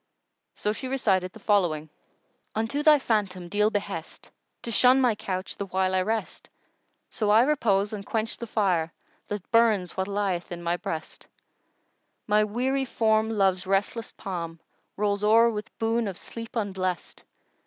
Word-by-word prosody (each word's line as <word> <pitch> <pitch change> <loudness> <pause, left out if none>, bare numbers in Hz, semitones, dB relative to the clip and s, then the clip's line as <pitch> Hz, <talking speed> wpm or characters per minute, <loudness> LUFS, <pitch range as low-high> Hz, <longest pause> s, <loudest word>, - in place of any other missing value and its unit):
So 210 - -1
she 260 - -6
recited 195 -9 +1
the 220 - -13
following, 175 -8 +1 0.7
"Unto 225 +7 -1
thy 300 0 +7
phantom 200 -8 -1
deal 210 +3 +2
behest 200 -6 -5
* - - -51
To 235 - -4
shun 255 +3 +5
my 250 -3 +4
couch 185 -2 -4
the 200 - -4
while 185 0 0
I 185 - +3
rest, 215 +1 -3 0.6
So 215 -4 -1
I 220 +3 +6
repose 220 -8 +1
and 205 -2 -5
quench 220 +2 -2
the 235 - -6
fire 180 -7 +1 0.2
* - - -38
That 205 -3 -6
burns 220 -6 +3
what 190 0 -1
lieth 200 -4 -2
in 175 0 -6
my 170 +1 +1
breast, 165 -2 -6 1.0
My 210 0 +3
weary 255 +6 0
form 220 -2 +2
Love's 195 -4 +1
restless 205 +4 0
palm 170 -4 -5 0.2
* - - -46
Rolls 205 0 0
o'er 230 +2 +5
with 210 -1 -5
boon 225 0 0
of 190 -3 -5
sleep 230 +1 -8
unblest. 190 -5 -3
205 Hz, 165 wpm, -26 LUFS, 185-225 Hz, 1.0 s, thy